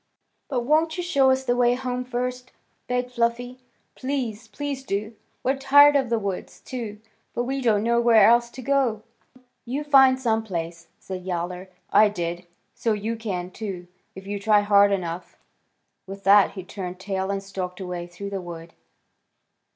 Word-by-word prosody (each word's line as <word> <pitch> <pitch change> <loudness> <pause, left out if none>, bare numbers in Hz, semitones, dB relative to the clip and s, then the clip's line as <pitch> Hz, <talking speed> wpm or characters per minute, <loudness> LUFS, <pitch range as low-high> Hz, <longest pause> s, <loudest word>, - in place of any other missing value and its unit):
"But 255 -4 0
won't 315 +6 +2
you 355 - -2
show 280 -7 +3
us 260 0 +2
the 245 -2 +1
way 245 0 +3
home 250 0 -3
first?" 250 0 -4 0.4
begged 250 0 -1
Fluffy. 245 +1 -1 0.3
"Please, 250 -5 -4
please 270 +5 -5
do. 215 -1 -3 0.3
We're 265 +2 +1
tired 285 +2 +6
of 265 -4 +2
the 230 - +2
woods, 200 -4 -5
too, 225 -5 -6 0.4
but 240 - 0
we 270 +2 -2
don't 215 -4 +2
know 235 +1 +2
where 230 -2 +6
else 235 +1 +4
to 260 - -8
go." 260 -6 +1 0.3
"Well, 255 - -22 0.2
you 265 +5 -3
find 265 -3 +5
some 225 -3 +1
place," 170 -5 -5
said 185 -1 -7
Yowler. 180 +1 -4 0.2
"I 215 0 +6
did, 175 -2 -4 0.3
so 225 - 0
you 215 +2 -3
can, 185 -5 -4
too, 190 -4 -6 0.3
if 190 0 -10
you 200 0 -4
try 210 0 +4
hard 205 0 +5
enough." 175 -2 -4 0.7
With 195 +1 -9
that 200 0 +6
he 190 - -7
turned 185 -1 -7
tail 190 0 -3
and 195 0 -2
stalked 185 -2 -6
away 180 -2 -5
through 200 +3 -8
the 195 -1 -3
wood. 170 -1 -9
220 Hz, 175 wpm, -24 LUFS, 190-250 Hz, 0.7 s, tired